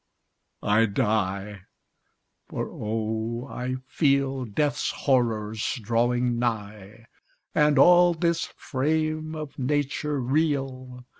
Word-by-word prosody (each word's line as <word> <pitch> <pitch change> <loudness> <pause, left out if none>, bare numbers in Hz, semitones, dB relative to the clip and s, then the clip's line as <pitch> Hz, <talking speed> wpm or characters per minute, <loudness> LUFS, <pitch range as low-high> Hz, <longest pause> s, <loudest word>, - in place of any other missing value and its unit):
I 110 +2 +3
die! 100 -2 -1 0.9
For, - - -3
oh! 110 +3 -3
I 125 -1 -4
feel 135 -2 +1
Death's 145 +6 0
horrors 110 -5 0
drawing 120 +2 +1
nigh, 110 -2 -4 0.5
And 150 -1 +3
all 175 +3 +6
this 170 0 0
frame 155 +3 -1
of 155 -3 -7
nature 145 +2 -1
reel. 130 -2 -1
125 Hz, 90 wpm, -26 LUFS, 110-145 Hz, 0.9 s, all